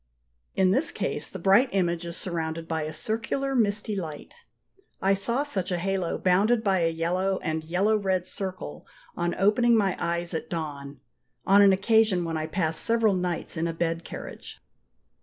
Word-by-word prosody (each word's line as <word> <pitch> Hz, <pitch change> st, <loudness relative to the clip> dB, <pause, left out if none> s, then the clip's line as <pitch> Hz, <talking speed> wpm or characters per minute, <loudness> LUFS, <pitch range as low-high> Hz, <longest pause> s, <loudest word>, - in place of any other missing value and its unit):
In 185 Hz, -1 st, +3 dB
this 275 Hz, +11 st, +2 dB
case -, -, -3 dB
the -, -, -7 dB
bright 200 Hz, +7 st, +4 dB
image 175 Hz, -3 st, 0 dB
is 170 Hz, -, -3 dB
surrounded 165 Hz, -2 st, -3 dB
by 160 Hz, -1 st, -2 dB
a 155 Hz, 0 st, -4 dB
circular 230 Hz, -, -2 dB
misty 210 Hz, -3 st, 0 dB
light. 160 Hz, -6 st, -6 dB, 0.7 s
I 195 Hz, +1 st, +2 dB
saw 235 Hz, +8 st, +2 dB
such 200 Hz, -11 st, -2 dB
a 180 Hz, -, 0 dB
halo 190 Hz, -1 st, -1 dB
bounded 210 Hz, +6 st, +2 dB
by 195 Hz, -3 st, +2 dB
a 165 Hz, -1 st, +2 dB
yellow 180 Hz, +4 st, -1 dB
and 160 Hz, 0 st, -2 dB
yellow 185 Hz, +7 st, +1 dB
red 190 Hz, -3 st, -1 dB
circle 185 Hz, -, -6 dB, 0.3 s
on 175 Hz, 0 st, -1 dB
opening 230 Hz, +4 st, +3 dB
my 195 Hz, -3 st, +1 dB
eyes 170 Hz, +1 st, -2 dB
at 160 Hz, -, -4 dB
dawn, 145 Hz, -5 st, -6 dB, 0.4 s
on 200 Hz, +1 st, +6 dB
an 200 Hz, -1 st, +7 dB
occasion 195 Hz, -2 st, +3 dB
when 165 Hz, -1 st, -3 dB
I 155 Hz, 0 st, -2 dB
passed 160 Hz, -4 st, +1 dB
several 225 Hz, -2 st, +2 dB
nights 180 Hz, -2 st, -2 dB
in 165 Hz, +1 st, 0 dB
a 165 Hz, -, -3 dB
bed 165 Hz, 0 st, -2 dB
carriage. -, -, -9 dB
185 Hz, 175 wpm, -26 LUFS, 165-205 Hz, 0.7 s, an